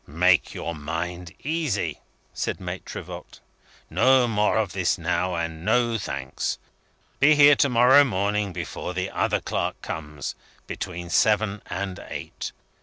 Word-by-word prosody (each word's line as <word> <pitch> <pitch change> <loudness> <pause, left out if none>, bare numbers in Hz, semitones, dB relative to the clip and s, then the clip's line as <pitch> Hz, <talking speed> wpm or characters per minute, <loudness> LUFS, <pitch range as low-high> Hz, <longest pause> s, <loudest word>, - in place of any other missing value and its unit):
"Make 90 +5 +3
your 85 - -4
mind 85 +3 -4
easy," 140 - -1 0.3
said - - -3
Maitre - - -6
Voigt. - - -10 0.5
"No 130 -1 +4
more 105 -1 +2
of 105 -5 0
this 90 -2 +1
now, 90 +1 -1
and 80 -1 -4
no 115 +3 +2
thanks! 70 -8 -3 0.6
Be 150 +2 +6
here 145 0 +8
to 140 - +3
morrow 125 +4 +7
morning, 105 -3 0
before 90 +1 -5
the 90 +1 -2
other - - +1
clerk - - -2
comes 75 -2 -5 0.3
between 90 -2 -6
seven 105 -1 +2
and 95 +1 -4
eight. - - -6
95 Hz, 135 wpm, -25 LUFS, 85-115 Hz, 0.6 s, here